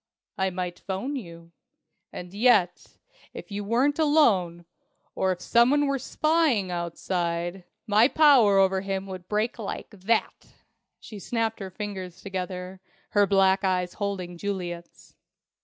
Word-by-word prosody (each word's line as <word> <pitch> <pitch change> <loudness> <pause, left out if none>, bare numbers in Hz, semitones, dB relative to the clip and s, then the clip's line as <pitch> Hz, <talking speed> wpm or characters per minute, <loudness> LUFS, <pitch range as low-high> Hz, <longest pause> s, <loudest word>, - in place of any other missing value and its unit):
I 190 -1 0
might 180 -1 -5
'phone 200 +9 -4
you. 170 -8 -9 0.6
And 180 +1 -9
yet, 200 -5 +2 0.4
if - - -9
you 205 +1 -4
weren't 255 +8 +1
alone, 200 - +2 0.5
or 190 - 0
if 180 -1 -4
someone 255 +8 +3
were 275 -1 0
spying 295 - +1
outside, 175 +1 -3 0.2
my 215 +3 +5
power 270 -10 +5
over 190 0 +3
him 195 0 -3
would 185 -2 -9
break 215 +3 -1
like 215 - -6
that!" 210 +3 -2 0.5
she 210 - -10
snapped 225 +1 -2
her 195 -2 -6
fingers 190 -3 -7
together, 185 -1 -6 0.3
her 205 -1 +3
black 195 0 +3
eyes 180 -2 0
holding 185 -4 -4
Juliet's. 175 -4 -6
195 Hz, 130 wpm, -26 LUFS, 180-225 Hz, 0.6 s, my